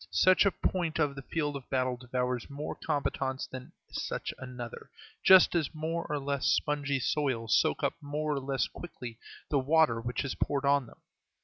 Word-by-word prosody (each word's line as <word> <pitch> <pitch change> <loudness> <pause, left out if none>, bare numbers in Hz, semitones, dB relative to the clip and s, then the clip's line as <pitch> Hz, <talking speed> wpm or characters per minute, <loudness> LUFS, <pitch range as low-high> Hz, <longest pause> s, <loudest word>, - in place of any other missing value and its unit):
Such 185 +2 +5
a - - +3
point 175 -3 -1
of 150 -3 +2
the 135 - -7
field 145 0 -2
of 135 -2 -8
battle 130 -1 +1
devours 125 0 -2
more 145 +2 -4
combatants 135 -3 -2
than 130 -1 -9 0.2
such - - -3
another, 125 -2 -7 0.3
just 190 -1 +8
as 165 -3 0
more 165 +2 -2
or 150 - 0
less 140 -1 -1
spongy 145 -2 +1
soils 125 -4 +1
soak - - +2
up - - +2
more 150 +1 -2
or 140 - -1
less 135 0 -1
quickly 125 -9 -9 0.3
the 145 - +3
water 145 -4 +3
which 125 +3 -2
is 135 - -2
poured 140 -1 -1
on 140 -2 +3
them. - - -17
140 Hz, 180 wpm, -30 LUFS, 130-150 Hz, 0.3 s, just